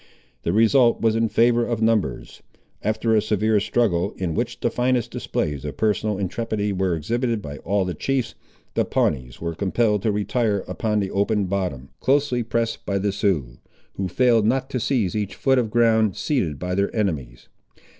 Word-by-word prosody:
The -, -, -1 dB
result 115 Hz, +4 st, +4 dB
was 110 Hz, -1 st, +2 dB
in 115 Hz, 0 st, +1 dB
favour 120 Hz, +1 st, +3 dB
of 115 Hz, -2 st, -2 dB
numbers. 110 Hz, -, 0 dB, 0.4 s
After 110 Hz, +2 st, 0 dB
a 110 Hz, -, +4 dB
severe 110 Hz, 0 st, +1 dB
struggle, 100 Hz, -4 st, 0 dB
in 90 Hz, -4 st, -2 dB
which 120 Hz, +6 st, -2 dB
the 120 Hz, -, 0 dB
finest 125 Hz, -1 st, 0 dB
displays 75 Hz, -3 st, -3 dB
of 75 Hz, -1 st, -6 dB
personal 105 Hz, -1 st, 0 dB
intrepidity 105 Hz, +1 st, -2 dB
were 95 Hz, -2 st, 0 dB
exhibited 115 Hz, -, -1 dB
by 75 Hz, -6 st, -8 dB
all 100 Hz, +1 st, 0 dB
the 90 Hz, -, -3 dB
chiefs, 130 Hz, -, -1 dB, 0.4 s
the -, -, +2 dB
Pawnees 60 Hz, -2 st, -1 dB
were 85 Hz, 0 st, -3 dB
compelled 105 Hz, +3 st, +1 dB
to 110 Hz, -, +1 dB
retire 105 Hz, 0 st, 0 dB
upon 105 Hz, +4 st, -1 dB
the 95 Hz, -, -3 dB
open 100 Hz, +1 st, +1 dB
bottom, 90 Hz, -9 st, -3 dB
closely 135 Hz, -2 st, +2 dB
pressed 115 Hz, 0 st, -2 dB
by 100 Hz, -, -1 dB
the 100 Hz, +1 st, 0 dB
Siouxes, 80 Hz, -12 st, -1 dB, 0.3 s
who 95 Hz, -, -3 dB
failed 115 Hz, +2 st, +3 dB
not 130 Hz, +3 st, 0 dB
to 130 Hz, -, -1 dB
seize 115 Hz, -5 st, 0 dB
each 105 Hz, -2 st, -2 dB
foot 135 Hz, -1 st, +2 dB
of 115 Hz, -3 st, -1 dB
ground 110 Hz, -3 st, +3 dB
ceded 95 Hz, -, -1 dB
by 90 Hz, +3 st, -3 dB
their 100 Hz, +2 st, +1 dB
enemies. 75 Hz, -, -2 dB
105 Hz, 175 wpm, -23 LUFS, 95-115 Hz, 0.4 s, result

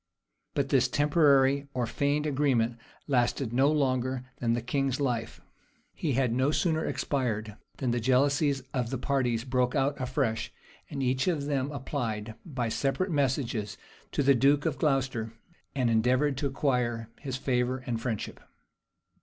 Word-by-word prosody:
But 140 Hz, -1 st, 0 dB
this 130 Hz, -2 st, +4 dB
temporary 140 Hz, -1 st, +3 dB
or 125 Hz, -1 st, +1 dB
feigned 145 Hz, +5 st, 0 dB
agreement 130 Hz, -5 st, +1 dB, 0.3 s
lasted 125 Hz, -2 st, +1 dB
no 135 Hz, +4 st, +4 dB
longer 130 Hz, -3 st, 0 dB
than 115 Hz, -1 st, 0 dB
the 120 Hz, -, 0 dB
king's 135 Hz, +1 st, 0 dB
life; 120 Hz, -5 st, -2 dB, 0.5 s
he 150 Hz, -5 st, -1 dB
had 125 Hz, -2 st, +1 dB
no 130 Hz, +3 st, +2 dB
sooner 160 Hz, 0 st, +1 dB
expired, 110 Hz, -6 st, -2 dB, 0.2 s
than 125 Hz, -3 st, -1 dB
the 120 Hz, -, 0 dB
jealousies 140 Hz, +3 st, +2 dB
of 125 Hz, -3 st, -1 dB
the 130 Hz, -, -2 dB
parties 125 Hz, -3 st, 0 dB
broke 125 Hz, 0 st, 0 dB
out 140 Hz, 0 st, 0 dB
afresh; 125 Hz, -4 st, -1 dB, 0.4 s
and 140 Hz, -2 st, -3 dB
each 130 Hz, +3 st, +1 dB
of 155 Hz, -6 st, 0 dB
them 140 Hz, -1 st, -1 dB
applied, 115 Hz, -6 st, -3 dB
by 130 Hz, -8 st, -3 dB
separate 140 Hz, -, -1 dB
messages, 130 Hz, -7 st, -1 dB, 0.3 s
to -, -, 0 dB
the 140 Hz, +1 st, +6 dB
duke 140 Hz, +3 st, +3 dB
of 155 Hz, -4 st, -1 dB
Glocester, 135 Hz, -6 st, 0 dB, 0.4 s
and 130 Hz, -3 st, +1 dB
endeavored 125 Hz, +5 st, +2 dB
to 140 Hz, -, 0 dB
acquire 125 Hz, -5 st, -1 dB
his 135 Hz, -3 st, -4 dB
favor 130 Hz, -1 st, 0 dB
and 115 Hz, -2 st, -2 dB
friendship. 115 Hz, -4 st, -3 dB
130 Hz, 150 wpm, -29 LUFS, 120-140 Hz, 0.5 s, the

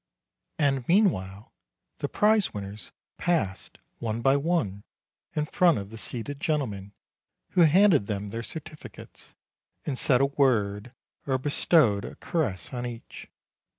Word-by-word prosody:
And 135 Hz, -4 st, +1 dB
meanwhile, 110 Hz, -, +1 dB, 0.5 s
the -, -, -2 dB
prize 210 Hz, -, +2 dB
winners 100 Hz, +1 st, -7 dB, 0.3 s
passed 110 Hz, -, -1 dB, 0.2 s
one 115 Hz, 0 st, -3 dB
by 135 Hz, +1 st, +4 dB
one 140 Hz, -, -1 dB, 0.5 s
in 150 Hz, -, 0 dB
front 175 Hz, +1 st, +3 dB
of 100 Hz, 0 st, -6 dB
the 115 Hz, -, -8 dB
seated 130 Hz, +5 st, -4 dB
gentlemen, 105 Hz, -11 st, -2 dB, 0.6 s
who 180 Hz, -, +2 dB
handed 165 Hz, -, +5 dB
them 105 Hz, -1 st, -3 dB
their 115 Hz, +3 st, -4 dB
certificates, 155 Hz, +4 st, -10 dB, 0.5 s
and 145 Hz, -, -2 dB
said 125 Hz, -2 st, +4 dB
a 135 Hz, -, +4 dB
word 120 Hz, -6 st, +1 dB, 0.4 s
or 130 Hz, -1 st, +2 dB
bestowed 130 Hz, -, +2 dB
a -, -, -8 dB
caress 130 Hz, -, -3 dB
on 120 Hz, -1 st, -3 dB
each. 120 Hz, -1 st, -9 dB
130 Hz, 130 wpm, -27 LUFS, 105-155 Hz, 0.6 s, handed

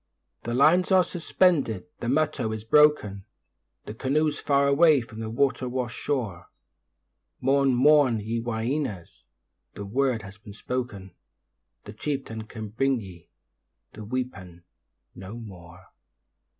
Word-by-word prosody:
The 120 Hz, +1 st, -3 dB
lines 175 Hz, +8 st, +4 dB
are 185 Hz, -1 st, +6 dB
suspended, 165 Hz, -, +1 dB
the -, -, -4 dB
'muttow' 135 Hz, -4 st, 0 dB
is 110 Hz, -, -8 dB
broken, 115 Hz, -7 st, +3 dB, 0.6 s
The 105 Hz, -, -7 dB
canoe's 145 Hz, +6 st, 0 dB
far 140 Hz, 0 st, +2 dB
away 150 Hz, +1 st, +5 dB
from 110 Hz, -1 st, -11 dB
the 110 Hz, -1 st, -4 dB
water 130 Hz, +1 st, 0 dB
wash'd 125 Hz, -2 st, -3 dB
shore, 110 Hz, -12 st, -3 dB, 0.9 s
Mourn, 135 Hz, 0 st, +2 dB
mourn, 135 Hz, -3 st, +4 dB
ye 110 Hz, +3 st, -3 dB
'whyeenas', 115 Hz, -, -4 dB, 0.5 s
the 100 Hz, -, -6 dB
word 125 Hz, +1 st, 0 dB
has 95 Hz, 0 st, -12 dB
been 105 Hz, 0 st, -12 dB
spoken, 105 Hz, -4 st, -5 dB, 0.7 s
The 105 Hz, -, -10 dB
chieftain 115 Hz, -3 st, -4 dB
can 110 Hz, -1 st, -8 dB
bring 135 Hz, +4 st, 0 dB
ye 90 Hz, -5 st, -12 dB, 0.6 s
the 110 Hz, -, -10 dB
'weepan' 100 Hz, -8 st, -5 dB, 0.5 s
no 95 Hz, +4 st, -9 dB
more. 90 Hz, -5 st, -12 dB
120 Hz, 125 wpm, -26 LUFS, 105-140 Hz, 0.9 s, are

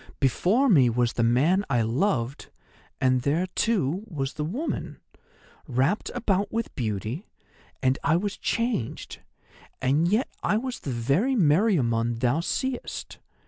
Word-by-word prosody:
Before 185 Hz, -, +2 dB
me 140 Hz, -, +5 dB
was 120 Hz, 0 st, +1 dB
the -, -, -1 dB
man 140 Hz, -, +3 dB
I 120 Hz, -4 st, +2 dB
loved, 130 Hz, -, -1 dB, 0.5 s
and 130 Hz, -1 st, +2 dB
there, 150 Hz, +7 st, +1 dB
too, 190 Hz, -, +1 dB
was 140 Hz, -8 st, -3 dB
the 150 Hz, -, -3 dB
woman, 235 Hz, -, -4 dB, 0.7 s
wrapped 135 Hz, -, 0 dB
about 200 Hz, -5 st, 0 dB
with 230 Hz, +1 st, -3 dB
beauty, 110 Hz, -, -3 dB, 0.6 s
and 130 Hz, +1 st, +2 dB
I 165 Hz, -, +3 dB
was 200 Hz, +3 st, -1 dB
changed, 230 Hz, -, -2 dB, 0.6 s
and 145 Hz, +6 st, +2 dB
yet 215 Hz, +8 st, +2 dB
I 210 Hz, -, +1 dB
was 255 Hz, +2 st, -4 dB
the -, -, -6 dB
very 140 Hz, -, +1 dB
Meriamun 145 Hz, -, +2 dB
thou 125 Hz, +5 st, +2 dB
seest. 255 Hz, +8 st, -3 dB
150 Hz, 135 wpm, -26 LUFS, 125-205 Hz, 0.7 s, me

